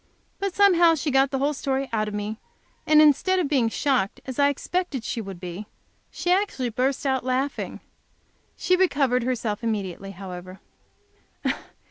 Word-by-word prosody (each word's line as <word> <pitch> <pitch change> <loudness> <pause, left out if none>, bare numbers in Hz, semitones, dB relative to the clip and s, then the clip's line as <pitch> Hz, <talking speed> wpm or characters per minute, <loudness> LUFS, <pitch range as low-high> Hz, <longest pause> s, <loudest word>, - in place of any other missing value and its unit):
But 395 -2 -2
somehow 350 -5 +5
she 305 -1 -2
got 270 +1 +4
the 270 - -1
whole 285 +3 +1
story 270 -1 -2
out 215 -1 0
of 210 - -5
me, 210 +2 -4 0.5
and 305 0 +6
instead 305 +6 +4
of 355 -5 +1
being 265 -6 +2
shocked, 245 -5 0
as 260 0 -6
I 285 0 +5
expected 285 -2 -2
she 230 - -3
would 195 -4 -8
be, 180 +3 -7 0.4
she 355 - -2
actually 365 -10 +1
burst 255 +5 -1
out 265 -2 +1
laughing! 260 +2 -2 0.8
She 365 - +2
recovered 280 -9 +2
herself 235 -3 -2
immediately, 195 -4 -3
however. 185 -1 -9
265 Hz, 155 wpm, -25 LUFS, 215-295 Hz, 0.8 s, and